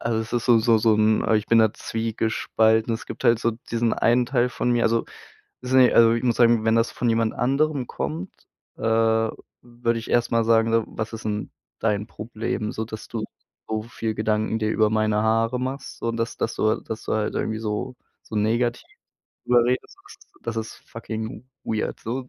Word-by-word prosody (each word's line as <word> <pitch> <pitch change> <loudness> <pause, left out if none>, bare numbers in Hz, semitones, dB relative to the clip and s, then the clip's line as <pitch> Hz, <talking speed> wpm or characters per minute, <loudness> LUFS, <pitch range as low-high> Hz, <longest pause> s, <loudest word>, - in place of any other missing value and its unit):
Also, 115 -1 -1
es 110 +1 -7
ist 120 -1 0
so 120 -2 +6
so 115 0 +4
so 110 0 +3
'n 110 0 +3
ah, 110 - +2
ich 105 -1 +1
bin 115 - +4
da 110 -2 +4
zwiegespalten. 110 0 0
Es 115 - -7
gibt - - -8
halt 115 -1 +5
so 115 +1 0 0.2
diesen 115 0 +1
einen 120 +1 +2
Teil 125 -1 +1
von 125 - -2
mir 120 - +2
also 115 0 +2 0.6
es 125 - -7
sind 130 0 +6
ja 125 - +6
also, 115 -1 +6
ich 115 - -2
muss 120 -2 +1
sagen, 115 -2 +4
wenn 110 0 +3
das 115 +1 +2
von 120 - -1
jemand 115 -1 +1
anderem 140 +1 0
kommt, 80 +5 -4 0.5
äh, - - -17
würde 115 +1 0
ich 115 - -8
erst 120 0 +2
mal 115 -1 +2
sagen: 115 0 +3
„W 115 - +3
was 110 +1 -5
ist 110 -1 -7
'n 105 0 -3 0.3
dein 105 -1 0
Problem, 110 -1 -4
so 110 - -3
dass 110 0 -9
du 110 -2 -4 0.4
so 110 -1 -2
viel 110 -1 -4
Gedanken 110 +1 0
dir 110 -1 0
über 110 -1 +3
meine 110 -1 +1
Haare 115 +2 +1
machst, 135 +2 -5
so 115 - -1
dass 115 0 -3
dass 115 - -2
du 110 0 +1
dass 110 - -7
du - - -3
halt 110 -1 -1
irgendwie 110 0 -2
so, 110 +4 -3 0.3
so 110 - -7
negativ 120 +3 0 0.6
darüber 120 -1 +4
redest?“ 125 +1 -2 0.5
Das 115 -1 -4
ist 110 0 -3
das - - -17
ist - - -33
fucking 110 +1 -6 0.2
weird 110 -1 -2
so. 125 +3 -4
115 Hz, 210 wpm, -24 LUFS, 110-120 Hz, 0.6 s, so